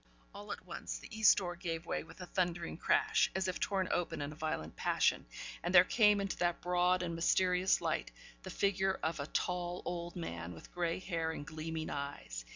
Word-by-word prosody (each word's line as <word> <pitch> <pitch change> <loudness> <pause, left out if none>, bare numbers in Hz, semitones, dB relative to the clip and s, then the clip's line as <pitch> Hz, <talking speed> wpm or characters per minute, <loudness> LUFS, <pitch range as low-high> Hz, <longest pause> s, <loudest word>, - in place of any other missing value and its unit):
All - - -8
at - - -6
once, - - -5
the - - -10
east 220 -2 +7
door 175 -3 -2
gave 165 -2 -4
way - - -2
with 165 - -13
a - - -5
thundering 175 -2 -1
crash, 165 - +3
as 190 0 0
if 185 - -2
torn 190 -2 0
open 175 - -1
in 145 0 -3
a - - -9
violent 150 - -3
passion, - - +1 0.3
and 175 +2 -1
there 175 - +11
came 210 0 +4
into 195 -1 -2
that 175 -1 +1
broad 180 +1 +2
and 170 -1 -2
mysterious 180 +2 +3
light, - - -1 0.3
the - - -8
figure 195 -1 +1
of 160 -1 -1
a 140 - -3
tall 180 0 -2
old 175 0 -4
man, 85 - -5
with 80 - -13
grey 170 -1 0
hair 165 -4 -2
and 155 -2 -5
gleaming 160 +1 -4
eyes. 140 - -5
175 Hz, 200 wpm, -34 LUFS, 160-185 Hz, 0.3 s, there